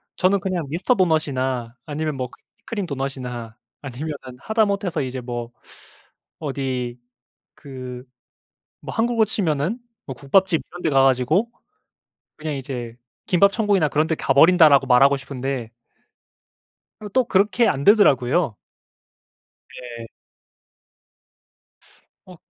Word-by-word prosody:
저는 195 +2 +2
그냥 180 -3 -2
미스터 180 - +1
도넛이나 130 -9 0
아니면 155 0 -3
뭐 130 -2 -4
크 - - -19 0.3
크림 205 -5 -3
도넛이나 125 -5 -5 0.2
아니면은 135 -1 -7
하다못해서 205 -5 0
이제 130 -1 -4
뭐 120 -1 -5 0.9
어디 130 -4 -3 0.6
그 130 -3 -9 0.8
뭐 - - -6
한국으로 230 -1 +2
치면은 180 - -1 0.3
뭐 135 - -6
국밥집 165 +6 +2
이런 175 +1 -10
데 160 - +1
가 135 -1 +4
가지고 135 - +2 0.9
그냥 155 0 -4
이제 125 -4 -6 0.3
"김밥천국이나 200 -2 +3
그런 155 +2 +1
데 160 - 0
가버린다."라고 145 -1 +5
말하고 135 +3 +5
싶은데 135 -3 -5 1.3
어 210 - -6
또 255 +6 +2
그렇게 210 +2 +2
안 135 +1 -1
되더라고요. 150 - +4 1.2
네. 120 -2 -8 2.2
어 185 -1 -13
140 Hz, 250 characters per minute, -22 LUFS, 130-185 Hz, 2.2 s, 가버린다."라고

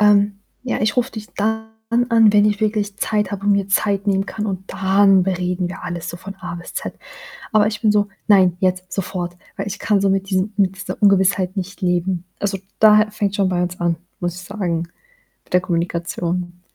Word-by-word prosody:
„Ähm, 205 -1 +4 0.2
ja, 255 - -2
ich 215 -1 +1
rufe 250 +1 +1
dich 220 -1 -8
dann 220 +1 0 0.4
an, 225 -3 +5
wenn 205 0 +5
ich 210 0 0
wirklich 210 -2 0
Zeit 210 -1 0
habe 200 -1 -5
und 205 - +4
mir 200 -1 +1
Zeit 200 0 +1
nehmen 195 -1 +2
kann 210 +1 -4
und 190 -1 -5
dann 195 0 +4
bereden 180 -1 -1
wir 180 - -8
alles 170 -1 -4
so 175 - -5
von 195 +2 -9
A 180 -2 -6
bis 175 0 -9
Z.“ - - -4 0.6
Aber 215 -1 +4
ich 210 -1 -2
bin 215 -2 +3
so: 205 0 +2 0.2
„Nein, 185 -4 +5
jetzt 185 0 0
sofort,“ 175 -2 -3 0.2
weil 195 0 -4
ich 200 - -4
kann 205 -2 +2
so 195 - +2
mit 195 0 0
diesem 190 +2 0
mit 195 -2 +2
dieser 190 - -6
Ungewissheit 190 -1 +3
nicht 195 +1 -5
leben. 180 -1 0
Also, 195 -1 -1 0.2
da 215 0 +6
fängt's 205 -1 -1
schon 195 -3 +2
bei 180 -1 0
uns 180 0 -4
an, 170 -1 +1 0.2
muss 175 -1 -2
ich 185 - -8
sagen, 175 -4 -3 0.6
mit - - -15
der 180 - +5
Kommunikation. 175 0 -2
195 Hz, 210 wpm, -20 LUFS, 180-205 Hz, 0.6 s, da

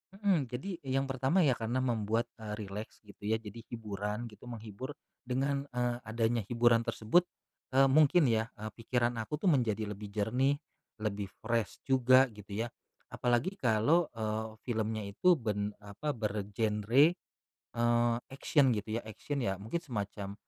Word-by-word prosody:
Mhm. 195 -9 +2
Jadi 125 +11 -5 0.2
yang 135 +1 +1
pertama 135 +8 +2
ya 145 - +5
karena 120 +3 -1
membuat, 115 -2 0
eee, 110 -1 -5
rileks 105 +3 -7
gitu 100 -1 -16
ya, 110 - +3
jadi 110 +1 -9
hiburan 105 -1 -4
gitu, 105 +3 -14
menghibur, 115 +4 -7 0.3
dengan, 140 +2 0
eee, 120 -1 +1
adanya 115 +1 +1
hiburan 120 0 +4
tersebut, 170 +12 +3 0.5
eee, 135 0 +7
mungkin 155 +4 +6
ya, 110 0 +1
eee, 110 -1 -6
pikiran 120 +1 -1
aku 110 +7 -3
tuh 190 - +5
menjadi 110 -7 +1
lebih 105 +1 -7
jernih, 110 +7 +1 0.5
lebih 100 -2 -2 0.2
fresh 115 -1 -1
juga 130 0 +6
gitu 105 +1 -5
ya. - - -3 0.4
Apalagi 125 +11 0
kalau, 125 +9 +3
eee, 110 0 -2
filmnya 110 -2 -1
itu 105 - +3
ben 105 -6 -2
apa 105 +9 -4
bergenre, 105 +3 +2 0.7
eee, 120 0 +3 0.2
action 135 -1 +3
gitu 110 +1 -2
ya, - - -3
action 110 +7 -5
ya 95 0 -2
mungkin 110 +11 -2
semacam 100 -5 -4
115 Hz, 150 wpm, -32 LUFS, 105-130 Hz, 0.7 s, eee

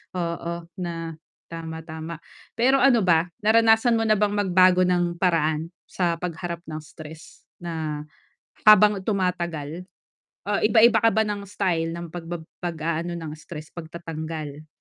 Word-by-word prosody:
oo, 170 -1 -3 0.2
na 165 -2 -4 0.4
tama, 160 -1 -6
tama. 160 0 -8 0.3
Pero 265 +4 +3
ano 245 -6 +5
ba, 170 -1 +3 0.2
naranasan 225 +1 +4
mo 225 - 0
na 215 - +4
bang 210 0 +1
magbago 185 -2 +4
ng 175 -1 0
paraan, 160 -3 +1 0.2
sa 175 -2 -1
pagharap 170 0 -5
ng 155 -3 -6
stress? 155 +1 -12 0.2
Na, 160 -3 -4 0.7
habang 210 -1 +7
tumatagal, 180 -4 -2 0.6
ah, 205 0 0
iba-iba 225 +1 +5
ka 225 - +5
ba 220 0 +1
ng 205 -1 -3
style, 170 -5 0
ng 170 0 -7
pagbab 170 -1 -6 0.2
pag-aano 170 0 -2
ng 160 -2 -6
stress, 155 0 -10
pagtatanggal? 160 -3 -7
170 Hz, 135 wpm, -24 LUFS, 160-200 Hz, 0.7 s, habang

